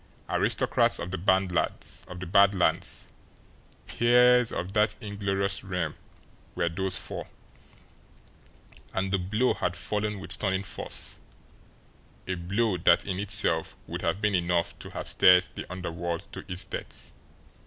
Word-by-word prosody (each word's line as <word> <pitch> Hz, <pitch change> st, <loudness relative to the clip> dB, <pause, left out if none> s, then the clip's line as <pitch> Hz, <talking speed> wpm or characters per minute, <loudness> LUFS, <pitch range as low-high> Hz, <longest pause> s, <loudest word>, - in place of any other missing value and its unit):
Aristocrats -, -, +3 dB
of 90 Hz, -, -5 dB
the 95 Hz, -, -2 dB
Bad 95 Hz, +1 st, +2 dB, 1.0 s
Lands, 90 Hz, -, 0 dB, 0.8 s
peers 125 Hz, 0 st, +5 dB
of 90 Hz, +3 st, -4 dB
that 105 Hz, 0 st, +2 dB
inglorious 100 Hz, -2 st, -1 dB
realm 90 Hz, -5 st, -2 dB, 0.6 s
were 85 Hz, -1 st, +1 dB
those 95 Hz, +2 st, -1 dB
four -, -, -5 dB, 1.7 s
and 95 Hz, 0 st, 0 dB
the 95 Hz, -, +3 dB
blow 105 Hz, +8 st, +1 dB
had 90 Hz, 0 st, -2 dB
fallen 105 Hz, +2 st, -2 dB
with 95 Hz, -, -8 dB
stunning 95 Hz, -1 st, 0 dB
force, -, -, -3 dB, 1.1 s
a 95 Hz, -, -1 dB
blow 95 Hz, +4 st, 0 dB
that 90 Hz, -, +4 dB
in 95 Hz, -2 st, -3 dB
itself 100 Hz, 0 st, 0 dB
would -, -, -5 dB
have 85 Hz, +4 st, 0 dB
been 105 Hz, -1 st, +1 dB
enough 85 Hz, -1 st, +1 dB
to -, -, -8 dB
have -, -, -6 dB
stirred 90 Hz, 0 st, +6 dB
the -, -, -8 dB
underworld 85 Hz, -2 st, -4 dB
to -, -, -6 dB
its 90 Hz, -, -1 dB
depths. -, -, -7 dB
95 Hz, 130 wpm, -28 LUFS, 90-105 Hz, 1.7 s, stirred